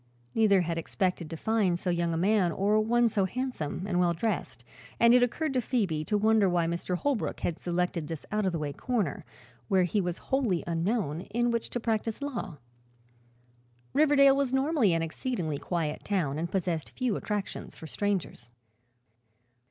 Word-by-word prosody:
Neither 205 -4 +4
had 165 -1 -2
expected 180 -1 -2
to 165 - -6
find 205 -3 +1
so 180 +1 -2
young 170 -1 0
a 165 - -1
man 190 0 +3
or 205 +5 +2
one 235 +2 +3
so 205 -3 +1
handsome 195 - -3
and 180 -3 0
well 175 -1 +2
dressed 220 +6 -3 0.3
and 235 0 +6
it 250 - +6
occurred 270 +5 0
to 255 - +1
Phoebe 200 -11 0
to 210 - +1
wonder 215 -1 +4
why 175 -1 +2
Mr. 170 +2 -2
Holbrook 275 +1 -1
had 170 - -2
selected 175 -2 -1
this 160 -2 -6
out 210 0 0
of 190 - +1
the 170 - -2
way 150 -2 -3
corner, 215 - -2 0.4
where 190 -2 +3
he 200 +4 +1
was 175 -2 -2
wholly 245 -11 0
unknown, 170 -1 -1
in 240 +3 +1
which 235 -1 -2
to 245 - -3
practice 225 -1 -1
law. 235 - -4 1.4
Riverdale 280 -2 +5
was 275 -2 0
normally 265 - +2
an 165 0 +1
exceedingly 165 - -3
quiet 160 -4 -2
town 155 -8 -1
and 170 +1 -2
possessed 175 -5 -2
few 250 -5 -1
attractions 205 -1 -4
for - - -10
strangers. 185 - -3
195 Hz, 175 wpm, -29 LUFS, 170-235 Hz, 1.4 s, and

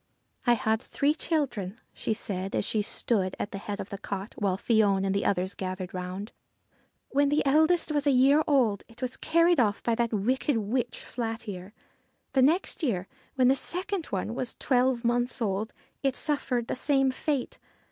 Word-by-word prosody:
' - - -28
I 240 - +7
had 220 -1 +1
three 285 +3 +1
children,' 250 - -2
she - - -3
said 195 -3 -3
as - - 0
she 215 - 0
stood 200 -2 -1
at 205 - -4
the 195 - -5
head 205 0 -5
of 195 - -5
the 200 - -5
cot, 200 +2 -5
while 195 -3 0
Fion 200 -3 +2
and 195 - +1
the 200 - 0
others 185 0 0
gathered 185 0 -5
round. 185 +4 -5 0.4
' - - -40
When 285 +1 +3
the 295 0 +2
eldest 315 +4 +3
was 290 -1 0
a - - +6
year 275 +4 +5
old 245 -9 +2
it 235 +2 -11
was 255 0 -1
carried 335 0 +3
off 210 -3 +1
by 235 - +1
that 235 0 0
wicked 240 +5 +1
witch, 235 +3 -2
Flat 225 -1 -4
Ear. 185 -1 -6 0.6
The 265 - +4
next 320 +10 +2
year, 195 - -1 0.3
when 255 -2 +4
the 265 - +5
second 365 +4 -2
one 195 +3 -2
was 245 -1 -3
twelve 250 -2 +1
months 240 +2 +1
old, 215 0 -1 0.3
it 270 -2 0
suffered 255 -5 0
the - - -3
same 270 0 +2
fate. 275 0 -2
235 Hz, 190 wpm, -28 LUFS, 200-275 Hz, 0.6 s, I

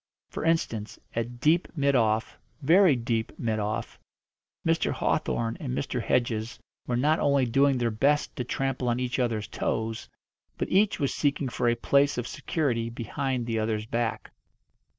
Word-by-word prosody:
For - - -4
instance, 135 -10 0 0.2
at 120 +1 -3
deep 160 +6 +3
mid 140 -2 +2
off 110 -2 +1 0.2
very 170 +1 +6
deep 115 -2 -2
mid 110 -2 -1
off 105 +1 -3 0.7
Mr. - - +2
Hawthorn 115 -1 -1
and 130 -4 -3
Mr. 125 -3 -2
Hedges 115 -1 0 0.3
were 120 - 0
not 150 +5 +2
only 140 -2 +3
doing 135 +3 +3
their 120 -2 0
best 140 +7 +1
to 125 - -1
trample 135 0 -1
on 120 +1 0
each 125 +1 -2
other's 115 -4 0
toes, 110 +1 -3 0.5
but - - -2
each 200 0 +3
was 140 -3 0
seeking 140 -2 0
for 120 0 +1
a 120 - +2
place 140 +4 +2
of 120 -1 -2
security 120 -8 -1
behind 125 +2 -3
the 115 -1 -1
other's 110 -1 -1
back. 115 0 -2
125 Hz, 160 wpm, -27 LUFS, 115-140 Hz, 0.7 s, very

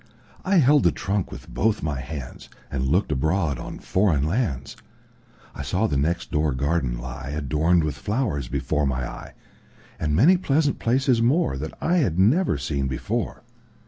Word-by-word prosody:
I 195 +1 +1
held 145 -3 +5
the - - +4
trunk 100 -1 -2
with - - -9
both 110 +1 0
my 70 -5 -2
handsAnd 65 -1 -6
looked 90 +3 +1
abroad 80 +1 0
on - - -7
foreign 90 -8 +1
lands.I 80 - -6
saw 90 +9 0
the 75 - 0
next 80 +5 -1
door 75 -1 +1
garden 70 -3 0
lie, 65 +2 -7
Adorned 80 +4 +2
with 75 -1 -1
flowers, 105 - -1
before 75 +2 -1
my 65 -2 -2
eye, - - -10 0.6
And 75 -1 0
many 165 - +6
pleasant 145 -4 +1
places 125 0 +2
moreThat 115 - +1
I 175 +2 +1
had 110 - +1
never 120 - +3
seen 70 -1 -2
before. 65 0 -3
80 Hz, 150 wpm, -24 LUFS, 70-115 Hz, 0.6 s, many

